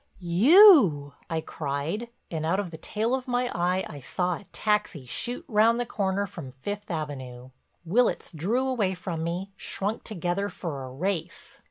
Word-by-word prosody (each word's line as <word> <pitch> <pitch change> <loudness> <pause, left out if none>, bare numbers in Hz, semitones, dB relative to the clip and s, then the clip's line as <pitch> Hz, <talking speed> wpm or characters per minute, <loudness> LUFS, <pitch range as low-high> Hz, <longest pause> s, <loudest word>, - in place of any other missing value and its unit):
"You!" 190 - +6 0.2
I 160 -1 -1
cried 155 +11 -3 0.2
and 160 -2 -3
out 170 +5 +1
of 190 -4 -3
the 160 - -9
tail 220 +3 -1
of 260 -1 -2
my 245 0 0
eye 180 +2 0
I 145 - -9
saw 180 +7 -1
a 205 - -15
taxi 210 -10 0
shoot 240 - -3
round 230 0 +4
the 245 - 0
corner 200 -2 -1
from 165 -8 -8
Fifth 205 +10 -6
Avenue. 130 -6 -5 0.3
Willitts 235 +9 +1
drew 210 - 0
away 210 -8 0
from 170 -2 -4
me, 180 +4 -3
shrunk 200 +2 -3
together 195 0 -2
for 155 -9 -5
a - - -8
race. 180 +4 -4
185 Hz, 165 wpm, -27 LUFS, 160-215 Hz, 0.3 s, You